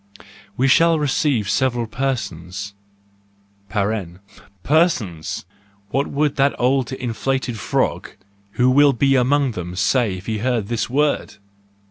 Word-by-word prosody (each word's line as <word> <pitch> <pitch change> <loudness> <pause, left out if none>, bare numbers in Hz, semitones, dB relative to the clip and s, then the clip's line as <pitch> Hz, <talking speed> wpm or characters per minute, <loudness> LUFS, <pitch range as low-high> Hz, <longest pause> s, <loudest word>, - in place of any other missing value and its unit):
We 130 - +2
shall 165 +5 +5
receive 140 -6 0
several 120 +3 +1
persons 105 -6 -4 1.0
(persons 100 - -2 0.2
!— 100 0 -36
what 140 +1 0
would 145 0 -1
that 140 +1 +3
old 130 +1 +1
inflated 130 -1 -2
frog, - - -1 0.4
who 125 +1 +3
will 140 +1 +5
be 135 +3 +2
among 135 +1 +2
them, 90 -4 -6
say, 100 +2 +1
if 90 - -11
he 110 -2 -2
heard 120 -3 -1
this 120 -2 -1
word! 145 -1 0
120 Hz, 120 wpm, -20 LUFS, 100-135 Hz, 1.0 s, shall